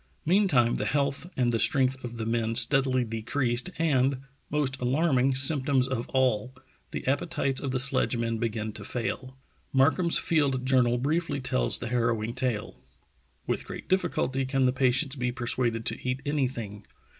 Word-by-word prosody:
Meantime 155 - +3
the - - -2
health 140 +3 -1
and 125 -2 +2
the 115 - +1
strength 130 0 +2
of 120 -1 -7
the 110 - -3
men 115 0 -1
steadily 130 -1 +3
decreased, 120 +5 -2
and, 135 -5 +2 0.3
most 135 -3 -1
alarming 135 0 +2
symptoms 135 -1 +3
of 130 -3 -4
all, 130 -1 0 0.3
the - - -6
appetites 135 -1 -1
of 140 - -3
the 130 - -1
sledgemen 120 -3 +1
began 110 -1 -2
to - - -9
fail. 130 +2 -4 0.3
Mark 135 +3 +3
ham's 170 -2 +4
field 140 -5 +1
journal 125 -2 +3
briefly 145 +2 -1
tells 60 - +1
the 120 - -6
harrowing 115 -2 0
tale: 125 - -2 0.7
''With - - -1
great - - -8
difficulty 170 -8 0
can 130 0 0
the 125 - +2
patients 130 +2 +1
be 125 -2 -2
persuaded 120 -1 0
to 125 - -2
eat 130 +2 -3
anything. 125 -8 -3
130 Hz, 155 wpm, -27 LUFS, 120-140 Hz, 0.7 s, ham's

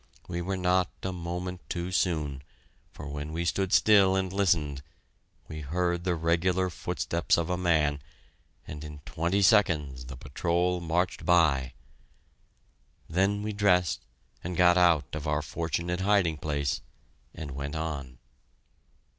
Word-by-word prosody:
We 85 0 -3
were 95 +2 -2
not 90 0 +2
a 95 - -2
moment 90 +1 -5
too 85 +1 -3
soon, 75 -7 0 0.5
for 75 - -9
when 75 +1 -5
we 85 +2 -2
stood 95 +2 0
still 100 -3 +5
and 95 -1 -1
listened, 80 -8 +1 0.7
we 80 -1 -7
heard 85 +4 -1
the 90 -2 +1
regular 90 +3 +1
footsteps 85 0 0
of 85 +1 -1
a - - +1
man, 80 -5 +1 0.6
and 75 0 -8
in 75 -1 -9
twenty 85 +7 0
seconds 75 - +3
the 65 +1 -8
patrol 85 +7 0
marched 85 +2 -1
by! 75 -7 +3 1.3
Then 100 +5 +1
we 105 0 -3
dressed 90 -4 +2 0.4
and 90 0 -4
got 90 -1 +6
out 85 -6 +4
of 75 0 -4
our 75 0 0
fortunate 85 +3 -2
hiding 95 -5 +2
place, 70 -2 -2 0.5
and 75 -3 -6
went 70 +3 -5
on. 70 -6 -4
85 Hz, 140 wpm, -28 LUFS, 75-90 Hz, 1.3 s, got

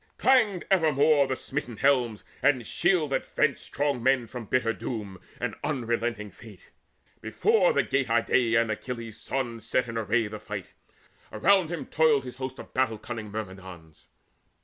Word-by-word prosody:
Clanged 220 -10 +3
evermore 150 -5 +4
The 130 - -1
smitten 130 -4 -5
helms 125 -5 +2 0.2
and 130 -5 +2
shields 175 - +1
that - - 0
fenced 155 -3 0
strong 140 -4 -1
men 130 0 +3
From 120 0 -8
bitter 115 0 +1
doom 105 -6 -6 0.2
and - - -2
unrelenting 120 -6 -2
fate, 105 0 -15 0.5
Before 450 +3 +3
the - - +2
Gate 135 -2 0
Idaean 115 0 +2
Achilles' 115 0 -6
son 120 -4 -3
Set 120 +3 0
in 115 -1 -3
array 115 +1 +1
the 105 0 -6
fight: 105 -3 -7 0.6
around 190 -3 +3
him 170 - -4
toiled 155 -4 +3
His 125 -1 -9
host 130 0 -5
of - - -11
battle 130 -4 +1
cunning 110 -1 -7
Myrmidons. 95 -6 -9
125 Hz, 150 wpm, -27 LUFS, 110-145 Hz, 0.6 s, evermore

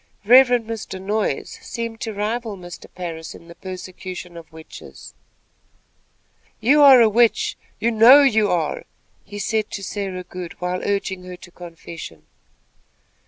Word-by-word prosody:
Reverend 245 0 +6
Mr. 220 -4 -6
Noyes 200 -5 -3
seemed 230 -1 -6
to 225 - -3
rival 215 +1 -3
Mr. 175 -1 -11
Parris 165 -3 -7
in 170 - -15
the 170 - -11
persecution 185 -1 -8
of 170 -1 -12
witches. 160 0 -13 1.5
"You 285 +6 +4
are 270 -4 +9
a 230 - +6
witch. 230 +2 +2 0.2
You 235 - +1
know 240 +6 +8
you 220 -6 +3
are," 165 -4 -1 0.4
he 205 - -10
said 215 +1 -1
to 200 - -6
Sarah 190 -2 -5
Good, 180 -1 -8
while 180 0 -3
urging 195 -2 -2
her 180 0 -8
to 175 0 -15
confession. 165 - -11
200 Hz, 140 wpm, -21 LUFS, 180-225 Hz, 1.5 s, are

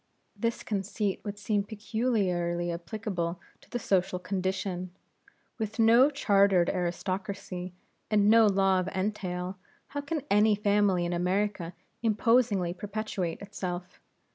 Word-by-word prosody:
This 230 +3 -2
conceit 200 -1 -2
would 205 -1 -5
seem 205 0 0
peculiarly 195 -6 -1
applicable 175 -1 -3 0.2
to - - -21
the 245 - -2
social 190 -5 +1
condition. 185 -1 -2 0.7
With 220 0 -3
no 230 +4 +6
chartered 200 -9 +3
aristocracy, 180 0 -3 0.3
and 205 -1 +3
no 225 0 +7
law 195 -1 +3
of 185 - -2
entail, 185 -1 -3 0.3
how 285 - -3
can 285 0 -3
any 210 +1 +5
family 200 -3 +2
in 175 - -1
America 180 0 -1 0.3
imposingly 220 -5 +2
perpetuate 200 -3 -4
itself? 180 -3 -6
195 Hz, 115 wpm, -29 LUFS, 180-215 Hz, 0.7 s, no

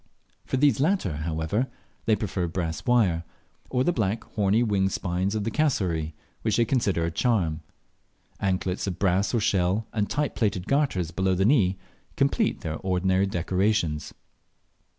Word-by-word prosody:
For - - 0
these 140 0 +3
latter, 140 - +1
however, 80 - -1 0.4
they 110 - +4
prefer 95 -4 -2
brass 80 +1 -4
wire, 100 -9 +3 0.5
or 125 0 +1
the 175 - +2
black, 110 -2 -1
horny, 105 +2 +2
wing 100 -4 +1
spines 90 +2 -1
of 105 - -1
the 115 - -2
cassowary, 90 - 0 0.3
which 110 - +1
they 120 - +4
consider 100 -10 +1
a 85 - -2
charm. 85 -4 +1 0.8
Anklets 95 0 -1
of 90 -3 -3
brass 95 +1 +2
or 120 - +1
shell, 100 0 +1
and 105 -2 0
tight 145 +4 -1
plaited 100 -5 -1
garters 130 - +1
below 95 +2 +1
the 95 +2 +2
knee, 100 -7 +3 0.4
complete - - +1
their 80 0 -3
ordinary 95 +1 +1
decorations. 90 -4 0
95 Hz, 150 wpm, -26 LUFS, 90-115 Hz, 0.8 s, they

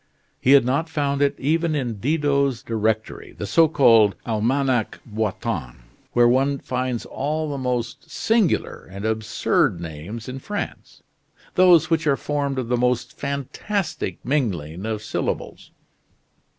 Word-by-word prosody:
He 135 - +4
had 135 -3 +6
not 140 +6 0
found 140 -3 -1
it 140 -1 +3
even 160 +3 +1
in 120 -7 -2
Didot's 140 -1 +1
directory, 110 -1 -2
the - - -4
so 160 +11 +4
called 115 -9 +5
"Almanach 120 +2 0
Boitin," 105 - -3 0.4
where 120 0 +5
one 135 +3 +2
finds 125 -2 -3
all 155 +2 -2
the 140 - -3
most 125 -2 -3
singular 225 -5 0
and 100 +2 -7
absurd 110 -5 +1
names 85 +8 -7
in 130 +1 -5
France 205 +9 -6 0.5
those 180 -3 +5
which 160 -1 +1
are 140 -2 +3
formed 140 -2 -2
of 130 -3 -2
the 125 +1 +1
most 125 0 0
fantastic 140 - -3
mingling 95 - -1
of 110 -1 -3
syllables. - - -4
130 Hz, 135 wpm, -23 LUFS, 110-145 Hz, 0.5 s, had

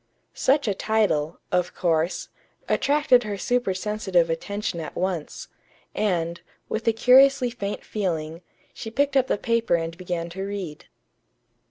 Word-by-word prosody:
Such 275 0 +2
a 205 - +2
title, 195 -8 0
of 180 0 0
course, 165 0 0 0.4
attracted 285 -3 +3
her 210 -3 -4
supersensitive 195 -6 0
attention 200 +2 -3
at 155 -2 -6
once; 180 -4 -3 0.5
and, 170 -5 -1 0.3
with 225 +2 -4
a - - +6
curiously 255 +2 +5
faint 205 -4 -5
feeling, 165 -5 -3 0.3
she 225 - -7
picked 280 +4 0
up 265 -1 +4
the - - +1
paper 230 -4 +1
and 165 0 -3
began 175 -1 -4
to 190 +3 -6
read. 195 -6 -5
200 Hz, 135 wpm, -24 LUFS, 170-230 Hz, 0.5 s, a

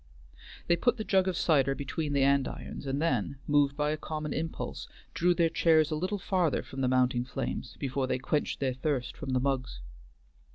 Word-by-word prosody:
They 170 - +3
put 245 +8 +1
the 220 - -3
jug 190 -3 +2
of 185 -3 -1
cider 135 -4 +3
between 145 +2 -3
the 140 -1 +3
andirons, 140 0 0
and 135 +1 -1
then, 135 - 0
moved 145 -1 +2
by 150 0 +1
a 155 - -1
common 155 0 -4
impulse, 160 +1 -4 0.3
drew 175 +1 +2
their 170 -2 +3
chairs 160 -1 +3
a - - +1
little 185 +6 -1
farther 180 -5 0
from 135 - -7
the 130 - +2
mounting 125 -1 +2
flames, 130 -1 -4
before 135 -1 -2
they 130 - 0
quenched 145 +3 -1
their 130 -2 +1
thirst 130 -1 -2
from 140 -4 -4
the 130 - +3
mugs. 130 - -1
145 Hz, 195 wpm, -29 LUFS, 135-160 Hz, 0.3 s, They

